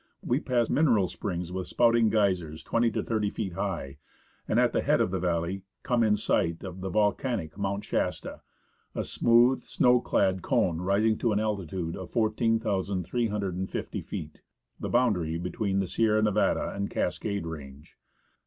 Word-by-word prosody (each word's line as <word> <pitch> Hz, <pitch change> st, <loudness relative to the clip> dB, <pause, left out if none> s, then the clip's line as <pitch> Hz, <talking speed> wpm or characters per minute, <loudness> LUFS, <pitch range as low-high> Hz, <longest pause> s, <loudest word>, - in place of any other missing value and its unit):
We 125 Hz, +3 st, +1 dB
pass 120 Hz, -5 st, +1 dB
mineral 120 Hz, -11 st, +3 dB
springs 90 Hz, -2 st, -4 dB
with 95 Hz, 0 st, -4 dB
spouting 115 Hz, -2 st, +3 dB
geysers 90 Hz, -8 st, 0 dB
twenty 115 Hz, 0 st, +2 dB
to 105 Hz, -, -2 dB
thirty 110 Hz, -3 st, 0 dB
feet 100 Hz, -3 st, -4 dB
high, 70 Hz, -4 st, -4 dB, 0.5 s
and -, -, +2 dB
at -, -, +3 dB
the -, -, +2 dB
head -, -, +2 dB
of 90 Hz, -, +1 dB
the 95 Hz, -, -1 dB
valley 90 Hz, +2 st, -1 dB, 0.2 s
come 120 Hz, -2 st, +1 dB
in 110 Hz, -2 st, +4 dB
sight 85 Hz, -5 st, 0 dB
of 95 Hz, -1 st, -7 dB
the 95 Hz, -, -3 dB
volcanic 105 Hz, -, 0 dB
Mount 100 Hz, 0 st, -2 dB
Shasta, -, -, -2 dB, 0.5 s
a -, -, -1 dB
smooth, 120 Hz, +2 st, +3 dB
snow 125 Hz, 0 st, +3 dB
clad 95 Hz, -5 st, +1 dB
cone 90 Hz, -10 st, +1 dB
rising 105 Hz, +4 st, +2 dB
to 115 Hz, -3 st, +1 dB
an 105 Hz, -, +1 dB
altitude 95 Hz, -5 st, -2 dB
of 95 Hz, -2 st, -7 dB
14,350 105 Hz, -3 st, -1 dB
feet, 75 Hz, 0 st, -7 dB, 0.4 s
the -, -, -4 dB
boundary 95 Hz, -10 st, +1 dB
between 95 Hz, +3 st, -2 dB
the 95 Hz, -, +1 dB
Sierra 110 Hz, +3 st, +2 dB
Nevada 105 Hz, -2 st, +1 dB
and 100 Hz, 0 st, -2 dB
the -, -, -15 dB
Cascade 100 Hz, +1 st, -1 dB
Range. 75 Hz, -3 st, -9 dB
100 Hz, 160 wpm, -28 LUFS, 90-115 Hz, 0.5 s, in